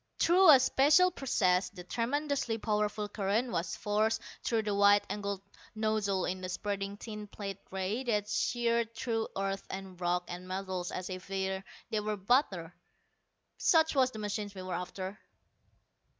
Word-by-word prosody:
Through 360 +1 +6
a 275 -4 +10
special 295 +8 +5
process 190 - +1
the 180 -3 -10
tremendously 255 +3 -1
powerful 210 -1 -1
current 210 +4 0
was 170 0 -2
forced 215 +1 +1 0.2
through 225 -2 +1
the 210 -1 -1
wide 200 0 +5
angled 200 -1 -3 0.3
nozzle 215 -3 0
in 185 +1 -3
a 185 - -3
spreading 200 +1 -3
thin 210 -1 -7
plate 200 -1 -6
ray 190 +6 -2
that 210 -4 +1
sheared 235 0 0
through 225 -2 -1
earth 195 0 -2
and 190 -1 -7
rock 175 0 +1
and 180 +1 -7
metals 185 -1 -3
as 185 +1 -5
if 185 0 -7
they 190 0 -2 0.3
were 210 -1 -1
butter. 195 - +1 0.9
Such 320 -1 +4
was 260 -3 +4
the 225 - -10
machine 210 -1 -3
we 185 - -6
were 185 -1 -4
after. 185 +3 -5
205 Hz, 150 wpm, -31 LUFS, 190-230 Hz, 0.9 s, a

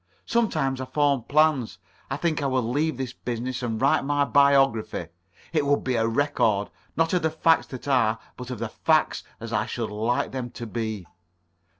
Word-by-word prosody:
Sometimes 155 - 0
I - - -3
form 140 -2 +1
plans. 145 - +2 0.3
I 135 - -2
think 160 0 0
I 140 - 0
will 130 -2 +1
leave 145 +3 0
this 130 -2 -4
business 125 0 -4
and 115 -3 -2
write 135 +1 +3
my 145 0 +1
biography. 135 - +3 0.4
It 155 -3 +2
would 145 0 +2
be 130 - 0
a 115 -1 +2
record, 115 -5 +1 0.3
not 165 +1 +2
of 180 - +2
the 160 - +2
facts 160 0 +2
that 130 +1 -8
are, 115 -5 +3 0.2
but 125 0 -8
of 125 - -4
the 115 +1 -4
facts 155 +6 +1 0.2
as 115 0 -7
I 110 +2 0
should 115 -3 -3
like 110 +4 -1
them 130 -2 -4
to 120 0 -8
be." 110 -4 -4
130 Hz, 190 wpm, -25 LUFS, 115-145 Hz, 0.4 s, write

